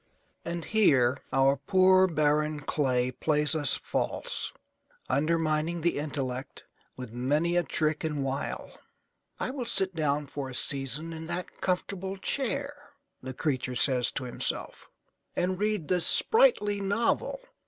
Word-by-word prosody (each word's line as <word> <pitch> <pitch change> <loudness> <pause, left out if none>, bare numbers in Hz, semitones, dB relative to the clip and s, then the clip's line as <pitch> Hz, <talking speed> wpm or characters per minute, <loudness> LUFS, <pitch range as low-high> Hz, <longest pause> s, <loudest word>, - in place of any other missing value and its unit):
And 170 -1 -4
here 135 - +3
our 135 +1 +4
poor 185 +5 +5
barren 150 -2 +1
clay 130 -4 +1
plays 150 +3 +1
us 145 -4 +4
false, - - -3 0.6
undermining 160 +2 +1
the 170 -2 +1
intellect 135 -3 -4 0.3
with 125 -3 -7
many 150 +8 +1
a 175 - +4
trick 155 -2 -1
and 150 -3 -1
wile. 135 +1 -4 0.6
"I - - -2
will 265 -2 -4
sit 190 -4 0
down 150 -2 0
for 140 -1 -5
a 125 - -7
season 140 +5 -3
in 160 0 -7
that 175 +1 -5
comfortable 190 +1 -2
chair," 275 +6 -1 0.5
the 130 0 -7
creature 130 -4 -1
says 125 -1 +2
to 135 - -3
himself, 125 - -3 0.5
"and 185 +1 0
read 210 -6 0
this 180 -2 +2
sprightly 445 - +3
novel. 205 - 0
155 Hz, 130 wpm, -29 LUFS, 135-185 Hz, 0.6 s, poor